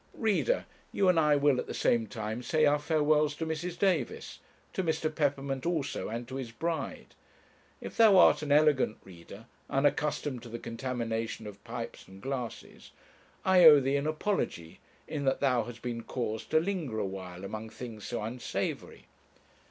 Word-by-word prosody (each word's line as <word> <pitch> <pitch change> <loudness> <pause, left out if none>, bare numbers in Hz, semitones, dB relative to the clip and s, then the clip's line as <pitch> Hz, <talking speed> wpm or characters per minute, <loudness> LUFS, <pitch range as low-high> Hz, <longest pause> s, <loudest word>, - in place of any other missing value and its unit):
Reader, 225 - +1 0.3
you 195 -2 +2
and 175 -2 +4
I 150 -2 +4
will 140 -2 +3
at - - -4
the - - -5
same 115 -2 +2
time 110 +2 -4
say 155 +4 +2
our 145 0 +3
farewells 150 -1 +2
to 160 - -3
Mrs. 165 +2 -4
Davis, 180 -10 -1 0.3
to 190 - -1
Mr. 160 -1 -1
Peppermint 140 -3 -1
also, 160 -5 -2
and 115 +2 -5
to 130 - -6
his 130 -3 -5
bride. 165 +7 -4 0.7
If - - -8
thou 220 -4 +7
art - - +6
an 150 -2 -3
elegant 145 -6 +4
reader, 95 +4 -12 0.2
unaccustomed 145 -1 0
to 120 - -10
the 120 - -5
contamination 115 -2 -4
of 100 -1 -10
pipes 120 0 -7
and 95 0 -13
glasses, 130 0 -6 0.6
I 185 -1 +6
owe 150 -2 +10
thee 135 +1 0
an 140 +1 0
apology 155 - -2 0.3
in 145 -2 -3
that 135 - +2
thou 125 -5 +2
hast 120 0 -10
been 120 -1 -3
caused 110 -2 -4
to 155 - +4
linger 165 - -2
a 110 - 0
while 95 -1 -7
among 110 +2 -6
things 110 -3 -9
so 120 -3 -4
unsavoury. 120 +3 -4
135 Hz, 170 wpm, -30 LUFS, 115-155 Hz, 0.7 s, owe